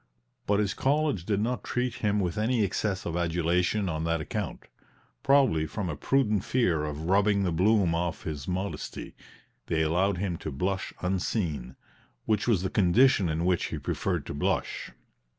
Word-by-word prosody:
But 100 0 +3
his 105 -2 +1
college 140 - 0
did 100 -2 +1
not 125 +3 -1
treat 125 0 -1
him 105 -1 +1
with 90 -4 -1
any 110 +1 +1
excess 100 0 -1
of 85 - -3
adulation 90 +4 +1
on 80 -2 -2
that 85 0 0
account, 75 - -4 0.6
probably 130 - +3
from 100 -1 -4
a 75 - -3
prudent 105 - +1
fear 90 -13 +1
of 75 0 -5
rubbing 100 +3 +3
the 90 - 0
bloom 95 +1 +3
off 85 0 -2
his 75 -3 -5
modesty; 95 +2 -4 0.5
they 80 -1 +1
allowed 90 +5 +1
him 90 -2 -2
to 80 - -5
blush 95 +8 -2
unseen 90 - -2 0.5
which 105 0 0
was 100 -7 +2
the 95 - 0
condition 100 0 +4
in 80 +2 -1
which 90 -1 +2
he - - -4
preferred - - -2
to - - -5
blush. 70 - -1
95 Hz, 170 wpm, -28 LUFS, 85-105 Hz, 0.6 s, condition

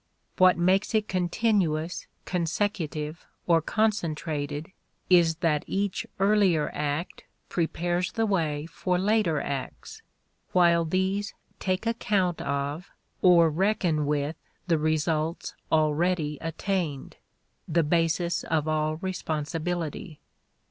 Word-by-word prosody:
What 185 -1 +6
makes 190 +5 +2
it 215 -1 +2
continuous, 180 -3 0 0.2
consecutive, 165 -3 -2 0.2
or 165 -2 +4
concentrated 155 -7 -1 0.4
is 170 -2 +5
that 150 -3 +2
each 200 -1 -2
earlier 195 -6 +3
act 150 +3 -3 0.3
prepares 175 +1 -1
the 225 - 0
way 160 -7 0
for 180 +2 -1
later 195 -5 +2
acts, 140 - -5 0.5
while 170 -2 +4
these 190 +5 -1 0.2
take 185 +2 -1
account 200 -6 0
of 140 +5 -3 0.3
or 170 -3 +6
reckon 175 -4 +1
with 150 +1 -1 0.3
the 165 -3 +2
results 155 +1 -1 0.2
already 155 0 +1
attained 165 -3 -3 0.5
the 165 +1 +2
basis 165 +2 +1
of 160 -1 0
all 155 0 0
responsibility. 165 -1 -3
170 Hz, 100 wpm, -27 LUFS, 155-185 Hz, 0.5 s, What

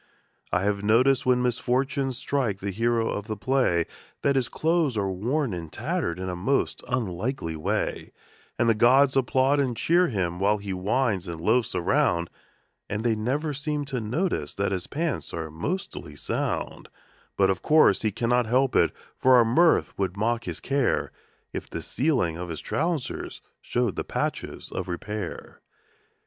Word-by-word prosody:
I 90 - +1
have 100 0 0
noticed 125 +5 +3
when 125 -1 +3
misfortune 130 +3 0
strikes 125 -5 -1
the 100 0 -3
hero 115 +2 +1
of 105 +1 -4
the 110 -2 -3
play 100 -7 +2 0.4
That 140 -1 +3
his 130 -3 +1
clothes 160 -6 +1
are 100 -2 0
worn 120 +6 -1
and 85 -3 -6
tattered 135 - -2
in 95 0 -4
a 90 - -3
most 130 +11 0
unlikely 110 - -2
way; 80 - -2 0.5
And 120 - +2
the 115 - +5
gods 130 +5 +5
applaud 135 +2 +3
and 125 -4 0
cheer 175 +2 +3
him 90 - -2
while 105 +2 +3
he 100 -1 -5
whines 100 0 0
and 85 -1 -5
loafs 110 +4 +1
around, 85 -1 +1 0.6
But 105 +2 -2
they 115 -2 +2
never 140 +8 -1
seem 145 +1 -2
to 125 - 0
notice 110 - -2
that 100 0 0
his 90 -2 -2
pants 155 -2 -3
are 80 -2 -4
mostly 145 - -4
sound; 70 - -3 0.5
Yet, 95 -1 +4
of 95 - -3
course, 155 0 +5
he 110 - +1
cannot 120 +3 +1
help 130 +3 +2
it, - - +4 0.3
for 130 0 +6
our 120 -2 +6
mirth 165 +9 +3
would 95 -1 -1
mock 115 +3 0
his - - -4
care 135 -3 0 0.4
If - - -5
the - - -4
ceiling 125 - 0
of 90 0 -5
his 80 - -4
trousers 160 -4 -2 0.2
showed 120 -6 -1
the - - -2
patches - - -4
of - - -4
repair. 95 +2 -5
115 Hz, 165 wpm, -26 LUFS, 95-135 Hz, 0.6 s, for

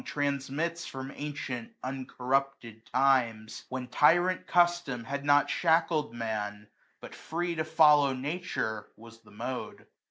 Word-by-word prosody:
Transmits 145 +4 -2
from 135 0 -7
ancient 135 -5 -5
uncorrupted 130 -2 -3
times; 120 -5 +1
When 130 -1 -4
tyrant 175 +8 +3
custom 175 -8 +2
had 140 +4 -4
not 145 0 +4
shackled 160 -4 +2
Man, 105 -2 -4 0.3
But - - -10
free 175 +2 -3
to 160 -1 -1
follow 150 -3 +5
Nature 135 - -3
was 115 +1 -15
the - - -20
mode. 125 +5 -6
135 Hz, 120 wpm, -29 LUFS, 120-155 Hz, 0.3 s, follow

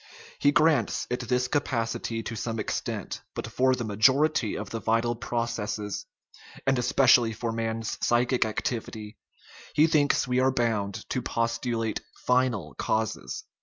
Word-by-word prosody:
He 145 - +4
grants 145 -6 +2
it 125 - 0
this 125 0 +2
capacity 115 -4 -1
to 115 - -5
some 115 +1 -3
extent; 105 - -3
but - - -3
for 130 0 +2
the 125 - -4
majority 130 +4 +3
of 105 -1 -6
the 115 - -3
vital 115 +2 +1
processes 115 -4 -3 0.6
(and 135 -2 +2
especially 125 -2 +4
for 115 +1 -3
man's 115 -1 -3
psychic 125 +1 +3
activity) 110 -1 -4 0.6
he 150 - +6
thinks 150 -5 +2
we 125 0 +1
are 130 +1 +4
bound 110 -6 -1
to 130 - 0
postulate 115 -1 -1
final 125 -10 0
causes. 110 -1 -2
115 Hz, 135 wpm, -27 LUFS, 110-130 Hz, 0.6 s, he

